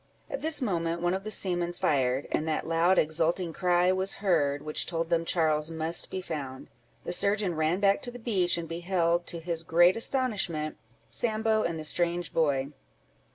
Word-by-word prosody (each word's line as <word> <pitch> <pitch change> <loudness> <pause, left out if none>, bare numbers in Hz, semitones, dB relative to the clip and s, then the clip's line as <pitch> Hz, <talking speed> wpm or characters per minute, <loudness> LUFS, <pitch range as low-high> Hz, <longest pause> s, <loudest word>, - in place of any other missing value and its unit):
At - - -4
this 310 -3 0
moment 170 -5 -1
one 175 +1 +2
of 190 +1 -3
the 215 - -5
seamen 175 -4 0
fired, 135 -5 0
and 155 - -1
that 155 - -1
loud 170 +3 +3
exulting 165 +2 +1
cry 180 0 +2
was 190 +1 0
heard, 150 -8 +1
which 155 0 -1
told 165 -1 -3
them 165 0 +2
Charles 155 -2 +1
must 160 +1 -1
be 185 - -4
found: 140 -7 -6 0.3
the 175 - -4
surgeon 200 0 +1
ran 160 +3 0
back 200 0 +3
to 245 - -5
the 245 - -9
beach, 190 -8 0
and 170 -1 -4
beheld, 170 0 0
to 170 - -4
his 165 0 -1
great 175 +2 +4
astonishment, 210 - -1 0.3
Sambo 220 -1 0
and 170 -5 -2
the 155 - -6
strange 175 +2 0
boy. 140 -4 +1
170 Hz, 180 wpm, -28 LUFS, 160-190 Hz, 0.3 s, great